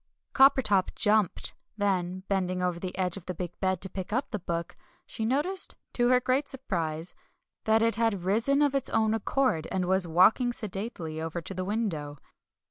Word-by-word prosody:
Coppertop 265 -8 +4
jumped. 210 -3 +2 0.2
Then, 185 -2 -1
bending 185 -2 -1
over 180 -1 -1
the 180 0 -5
edge 185 -1 0
of 185 - -11
the 180 - -4
big 175 0 -6
bed 190 -2 0
to 190 - -1
pick 190 0 -6
up 255 +5 -1
the 210 - -2
Book, 170 -1 -4 0.3
she 220 - -4
noticed, 300 +11 0 0.2
to 240 -1 +2
her 250 0 +5
great 260 +3 0
surprise, 170 - -3 0.5
that 220 +1 +3
it 230 -1 +3
had 225 -6 +1
risen 230 +10 +2
of 285 -2 +2
its 275 - 0
own 220 -1 +2
accord, 225 -7 0
and 185 -1 0
was 190 0 +4
walking 210 +9 +4
sedately 190 -7 -4
over 165 +1 -3
to 170 - -7
the 185 0 -3
window. 175 -9 -3
195 Hz, 180 wpm, -28 LUFS, 180-230 Hz, 0.5 s, her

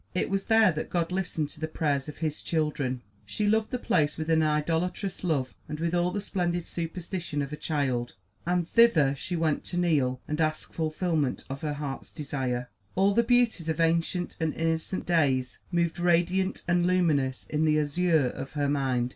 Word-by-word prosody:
It 185 - 0
was 195 0 0
there 220 -3 +5
that 155 -1 -4
God 170 -1 0
listened 175 -5 -2
to - - -11
the 160 - -2
prayers 150 -3 -1
of 150 - -9
His 155 -2 -2
children. 150 -6 -1 0.2
She 210 - -2
loved 220 +1 +2
the 250 - -2
place 155 -12 +1
with 160 0 -2
an 160 0 +4
idolatrous 165 +6 -1
love 140 -7 0 0.2
and 150 0 -4
with 170 +1 -1
all 175 0 +2
the 205 - -2
splendid 175 -4 -1
superstition 170 -2 -3
of 140 +2 -6
a - - -1
child, 135 - -1 0.3
and 175 -1 0
thither 175 -13 +5
she 175 +6 -4
went 160 -3 0
to 175 - -4
kneel 145 -8 +2
and 150 +2 -1
ask 155 -1 -1
fulfilment 160 -2 -1
of 135 - -5
her 150 -1 -2
heart's 140 -2 -5
desire. 130 -4 -3 0.3
All 195 +2 +4
the 235 - +4
beauties 235 -8 +2
of 160 - -1
ancient 170 +2 +1
and 160 -1 0
innocent 165 +3 -1
days 135 -7 +1
moved 170 -1 0
radiant 175 +2 +2
and 175 0 +3
luminous 155 -8 +1
in 155 +1 0
the 155 -1 +3
azure 155 0 +2
of 135 +2 -7
her 145 -2 0
mind. 130 -4 +1
160 Hz, 190 wpm, -28 LUFS, 145-180 Hz, 0.3 s, there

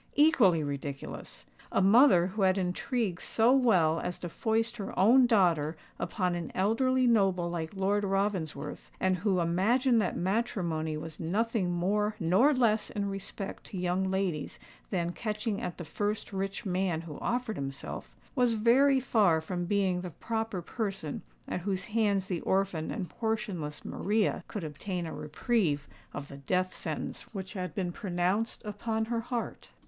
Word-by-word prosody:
Equally 245 - +5
ridiculous! 140 -1 -5 0.3
A - - +2
mother 195 -2 +6
who 195 +3 -3
had 190 0 +4
intrigued 190 +1 -1
so 230 +2 +3
well 185 -12 +4
as 180 - -3
to 175 - -6
foist 225 +5 0
her 200 - -6
own 245 +6 +6
daughter 170 -8 +3 0.2
upon 185 -4 -1
an 170 -2 -4
elderly 255 +6 +2
noble 195 -7 +3
like 165 +1 -4
Lord 200 +2 +1
Ravensworth, 190 -7 -2
and 185 -1 +2
who 190 0 +1
imagined 225 +9 +3
that 185 - -1
matrimony 175 -6 -1
was 160 0 -8
nothing 205 +3 0
more 210 +5 +1
nor 190 - +4
less 225 -6 +2
in 200 -1 -2
respect 195 0 -6
to 195 - -7
young 180 +1 0
ladies 190 -6 -1 0.3
than 175 -3 -1
"catching 215 +1 -3
at 175 - -4
the 175 - -6
first 205 +6 -2
rich 195 +3 -3
man 180 -3 0
who 160 -3 -8
offered 245 -2 -1
himself," 135 0 -6 0.2
was 245 -3 +2
very 265 +5 +5
far 205 -10 +3
from 175 +2 -3
being 190 -2 +1
the 180 - -5
proper 220 +2 -3
person 195 - -4 0.3
at - - -2
whose 195 +1 -2
hands 210 -4 +1
the 180 -3 -3
orphan 190 -4 0
and 195 -5 -3
portionless 205 -11 -3
Maria 210 +1 0
could 210 - -5
obtain 170 +4 -4
a 160 - -5
reprieve 150 - 0 0.2
of 145 - -6
the 140 - -10
death 185 +6 -1
sentence - - -4
which 190 0 -5
had 185 -3 -4
been 185 -3 -1
pronounced 185 +4 -1
upon 220 +2 -2
her 230 0 -1
heart. 235 0 -4
195 Hz, 155 wpm, -30 LUFS, 175-220 Hz, 0.3 s, mother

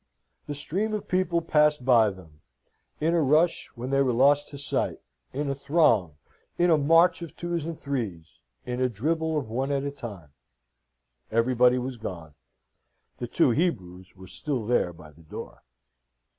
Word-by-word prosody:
The 145 - -4
stream 200 +9 -1
of 210 - -5
people 180 -2 +1
passed 150 -4 +2
by 115 -4 +5
them 80 -6 -13 0.6
in 160 +2 +1
a 170 - +3
rush, 155 +4 +2
when 125 +2 -5
they 135 0 +3
were 130 -2 +2
lost 145 +4 +4
to 145 - -9
sight, 140 - -1 0.3
in 145 +2 -3
a 140 - 0
throng 135 - +2 0.4
in 175 0 +3
a 160 - +5
march 165 +5 +4
of 170 - -8
twos 170 -3 -3
and 165 -1 -6
threes 95 - -5 0.2
in 125 +1 -3
a 130 - +2
dribble 160 +8 -1
of 140 - -2
one 130 +5 -2
at 140 -1 0
a 140 - -3
time. 100 - -9 1.0
Everybody 125 +2 +3
was 125 0 -4
gone. 85 -8 -7 0.9
The 120 - -4
two 140 +1 +3
Hebrews 95 - -2
were 95 0 -12
still 130 +3 -4
there 115 -6 +1
by 80 -3 -14
the 80 +2 -20
door. 80 - -9
135 Hz, 170 wpm, -26 LUFS, 110-155 Hz, 1.0 s, by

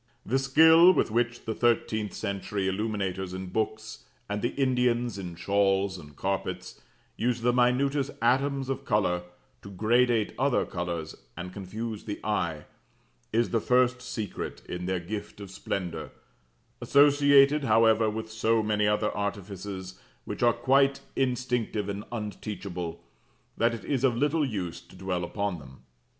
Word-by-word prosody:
The 135 - +1
skill 160 +6 +7
with 120 - +1
which 120 +1 -1
the 110 - -2
thirteenth 110 -3 0
century 100 -1 -3
illuminators 95 -2 -2
in 95 0 -6
books, 110 +2 -3 0.2
and 105 0 -3
the 120 - -2
Indians 125 -4 +1
in 90 -3 -6
shawls 95 +1 +1
and 75 -3 -13
carpets, 95 +2 -3 0.4
use 120 +1 0
the 120 +1 +2
minutest 135 +3 +2
atoms 135 +3 +1
of 135 -1 -3
colour 90 -5 +1 0.4
to 100 - -10
gradate 115 +3 +2
other 135 -1 +2
colours, 85 -3 -4 0.2
and 90 +1 -6
confuse 105 +3 -6
the 105 - -5
eye, 85 -8 -1 0.7
is 115 +1 +1
the 115 - +2
first 125 +1 +2
secret 110 -5 -5
in 90 0 -5
their 95 -1 0
gift 105 +4 -6
of 100 -2 -9
splendour: 95 -2 -4 0.7
associated, 145 0 +5
however, 110 -1 +4
with 110 +1 -5
so 110 0 +1
many 105 -1 +1
other 105 0 +1
artifices 100 -2 -5 0.3
which - - -6
are 120 -1 +5
quite 135 +3 +2
instinctive 125 -5 -1
and 100 +1 -4
unteachable, 100 -6 -5 0.5
that 115 +1 +2
it 110 - -10
is 135 -3 -1
of 125 -3 +3
little 150 +4 +2
use 95 -8 -4
to - - -18
dwell 90 -2 -3
upon 100 0 -2
them. 65 -2 -14
110 Hz, 145 wpm, -28 LUFS, 95-125 Hz, 0.7 s, skill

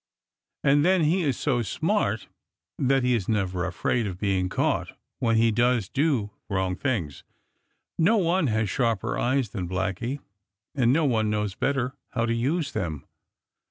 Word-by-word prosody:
And 145 +1 +4
then 185 0 +4
he 170 +5 +2
is 140 -7 0
so 125 -5 0
smart 105 - -1 0.5
that 135 0 +2
he 125 0 +3
is 110 -5 -1
never 95 -5 0
afraid 120 -3 -1
of 90 -3 -5
being 95 -2 0
caught - - -1 0.2
when 115 -1 +2
he 115 0 +4
does 120 -2 +2
do 135 -8 0 0.2
wrong 95 -2 0
things. 95 - -2 0.8
No 210 +8 +4
one 175 -3 +2
has 110 -2 +1
sharper 115 0 0
eyes 130 -2 +1
than 95 -5 -4
Blacky, 95 +8 -2 0.6
and 125 -5 +3
no 155 +3 +3
one 110 -5 +1
knows 105 -2 -1
better 130 +3 -1 0.2
how 115 -1 +1
to 115 - 0
use 140 +5 0
them. 80 -6 -4
115 Hz, 160 wpm, -26 LUFS, 100-140 Hz, 0.8 s, And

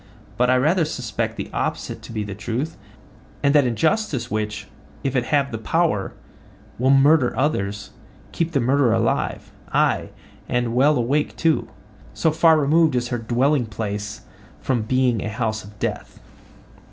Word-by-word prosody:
But 125 0 +2
I 130 - +5
rather 160 +7 +3
suspect 125 -8 -3
the - - -5
opposite - - -3
to - - -11
be 110 -2 -3
the 100 -1 -6
truth, 120 +9 -3 0.7
and 140 0 +4
that 145 -4 +5
injustice 135 - 0
which, 105 0 -3 0.4
if 135 -1 -1
it 125 -2 +1
have 140 -1 +1
the 115 - -4
power, 160 - 0 0.7
will 130 +2 +2
murder 135 -2 +4
others, 105 -8 -1 0.4
keeps 165 0 -2
the 140 - +2
murderer 130 -1 +3
alive—aye, 115 0 -1 0.4
and 120 -1 0
well 140 +4 +4
awake 140 +5 0
too; 160 -1 +1 0.5
so 160 - +2
far 160 0 +5
removed 155 0 +3
is 120 0 -1
her 120 - -2
dwelling 125 +3 +1
place 105 -1 -5 0.4
from 125 -4 0
being 125 0 +1
a - - -3
house 110 0 -2
of 105 +2 -14
death. - - -4
125 Hz, 150 wpm, -22 LUFS, 110-145 Hz, 0.7 s, I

